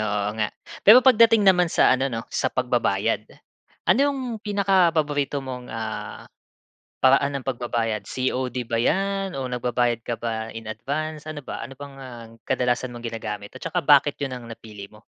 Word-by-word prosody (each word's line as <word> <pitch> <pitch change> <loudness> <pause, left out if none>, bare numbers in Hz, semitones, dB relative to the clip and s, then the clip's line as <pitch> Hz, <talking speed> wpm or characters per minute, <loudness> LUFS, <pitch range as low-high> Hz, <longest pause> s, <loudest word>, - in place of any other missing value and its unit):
oo 105 -1 -1
nga. 105 - +1 0.3
Pero, 240 +5 +8
pagdating 230 -4 +6
naman 180 -3 +5
sa - - +4
ano 130 +1 +1
'no, 115 -3 -4
sa - - 0
pagbabayad, - - 0 0.6
ano - - +4
'yong 280 -1 +1 0.2
pinakapaborito 165 - +1
mong, 125 -1 -7
ah, 110 -1 -6 0.7
paraan 140 +1 +3
ng 130 - -13
pagbabayad, 120 -4 -2
COD 130 -1 -2
ba 115 0 -1
'yan 195 0 0
o 130 - -3
nagbabayad 120 -1 0
ka 120 0 -4
ba, 115 -1 -3
in 115 0 -9
advance? 145 +8 -4
Ano 150 -2 -7
ba - - -5
ano 135 +1 -9
bang 140 -1 -9
ang 120 -4 -10
kadalasan 125 -1 0
mong 120 0 -7
ginagamit, 105 -3 -6
at - - -11
saka - - -2
bakit 145 0 +4
'yon 135 -2 -3
ang 120 -2 -9
napili 105 -3 -10
mo? 105 +1 -18
130 Hz, 165 wpm, -24 LUFS, 115-150 Hz, 0.7 s, Pero